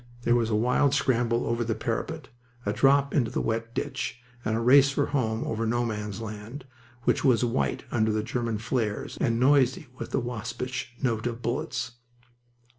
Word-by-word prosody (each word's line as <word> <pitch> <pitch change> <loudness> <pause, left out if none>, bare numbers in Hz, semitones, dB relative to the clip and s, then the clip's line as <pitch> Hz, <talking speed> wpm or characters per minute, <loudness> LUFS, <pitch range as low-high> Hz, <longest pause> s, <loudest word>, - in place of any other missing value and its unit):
There 120 - +3
was 115 -2 +2
a 110 - +1
wild 125 +5 +3
scramble 120 -3 +1
over 115 +1 0
the 115 -1 -1
parapet, 130 +7 -3 0.4
a - - 0
drop 140 +1 +4
into 120 -6 +2
the - - -2
wet 115 +1 -2
ditch, 125 - -3 0.2
and 110 +1 0
a - - 0
race 135 +4 +6
for 140 +1 +1
home 115 -5 -1
over 115 +1 -2
No 120 +2 +1
Man's 105 -2 -4
Land, 110 +5 -7 0.4
which - - +2
was 125 -4 +4
white 120 +2 -1
under 110 -2 +2
the 110 0 0
German 115 -1 -2
flares 110 -1 -2
and 115 0 +2
noisy 130 +1 +4
with - - -5
the - - 0
waspish 120 +1 -4
note 115 -3 +1
of 120 0 -5
bullets. 125 0 -2
120 Hz, 180 wpm, -27 LUFS, 115-130 Hz, 0.4 s, race